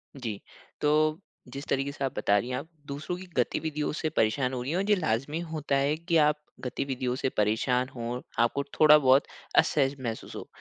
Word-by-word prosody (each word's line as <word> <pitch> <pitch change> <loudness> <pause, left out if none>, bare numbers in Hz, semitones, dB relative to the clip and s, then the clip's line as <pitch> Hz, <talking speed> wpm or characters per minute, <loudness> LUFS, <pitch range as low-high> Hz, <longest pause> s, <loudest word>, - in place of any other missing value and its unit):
जी। 115 -7 -5 0.4
तो, 155 +2 +2 0.3
जिस 140 +3 -7
तरीके 135 +1 0
से 140 - -6
आप 130 - -3
बता 100 - +3
रही 120 +4 -2
हैं, 125 - -1
आप - - -6 0.2
दूसरों 145 +5 -4
की 185 - -9
गतिविधियों 150 -2 0
से 155 0 -2
परेशान 130 -1 +1
हो 125 - -2
रही 135 - -3
हैं, 180 +3 +1
ये 210 - +6
लाज़मी 145 - -1
होता 150 -3 -1
है 140 +2 +2
कि 170 +1 +1
आप 150 0 0 0.3
गतिविधियों 125 -1 -2
से 130 - -1
परेशान 125 +5 +1
हों, 120 +1 -3 0.2
आपको 130 +4 0 0.2
थोड़ा 150 -1 +9
बहुत 135 -1 +5 0.3
असहज 140 -2 +3
महसूस 115 -3 -5
हो। - - -7
140 Hz, 190 wpm, -28 LUFS, 125-150 Hz, 0.4 s, थोड़ा